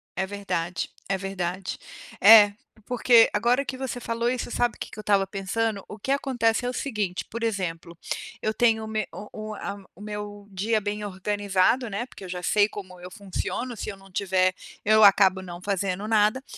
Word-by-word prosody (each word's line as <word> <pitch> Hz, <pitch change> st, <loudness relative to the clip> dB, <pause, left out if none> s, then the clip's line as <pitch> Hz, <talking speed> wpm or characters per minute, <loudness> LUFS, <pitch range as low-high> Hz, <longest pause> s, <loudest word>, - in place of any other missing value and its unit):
É 190 Hz, -, 0 dB
verdade, 185 Hz, -4 st, -3 dB, 0.2 s
é 195 Hz, 0 st, 0 dB
verdade. 190 Hz, -1 st, -4 dB, 0.4 s
É, 205 Hz, 0 st, +9 dB, 0.3 s
porque 245 Hz, -2 st, +5 dB
agora 240 Hz, +6 st, +2 dB
que 260 Hz, -, -5 dB
você 260 Hz, -2 st, -4 dB
falou 235 Hz, 0 st, -1 dB
isso, 250 Hz, -1 st, -3 dB
sabe 240 Hz, -1 st, +1 dB
o -, -, -21 dB
que -, -, -5 dB
eu -, -, -5 dB
estava 200 Hz, -2 st, +3 dB
pensando? 200 Hz, +2 st, -2 dB
O 210 Hz, -, -9 dB
que 265 Hz, -, -3 dB
acontece 245 Hz, -4 st, +1 dB
é -, -, 0 dB
o 250 Hz, -, -4 dB
seguinte, 210 Hz, -9 st, -2 dB
por 230 Hz, +1 st, -5 dB
exemplo, 175 Hz, -6 st, -3 dB, 0.4 s
eu 215 Hz, -, 0 dB
tenho 220 Hz, -1 st, +3 dB
o -, -, -7 dB
meu 215 Hz, -2 st, -1 dB
o 210 Hz, -, -8 dB, 0.2 s
o -, -, -5 dB
a 200 Hz, 0 st, -5 dB, 0.2 s
o 195 Hz, -, -15 dB
meu 210 Hz, -1 st, -7 dB
dia 215 Hz, +3 st, 0 dB
bem 210 Hz, +1 st, -3 dB
organizado, 205 Hz, +4 st, +1 dB
né, 205 Hz, +4 st, -3 dB
porque 240 Hz, -, -13 dB
eu -, -, -9 dB
já 180 Hz, 0 st, -5 dB
sei 205 Hz, +2 st, +4 dB
como 185 Hz, -4 st, -9 dB
eu 180 Hz, +1 st, -9 dB
funciono, 230 Hz, +4 st, -4 dB
se -, -, -4 dB
eu 195 Hz, -, -7 dB
não 195 Hz, -1 st, -18 dB
tiver 185 Hz, -1 st, +2 dB, 0.3 s
eu 215 Hz, +1 st, +5 dB
acabo 195 Hz, -2 st, +6 dB
não 175 Hz, -1 st, -8 dB
fazendo 195 Hz, +1 st, -2 dB
nada. 215 Hz, +4 st, +3 dB
205 Hz, 195 wpm, -26 LUFS, 190-225 Hz, 0.4 s, É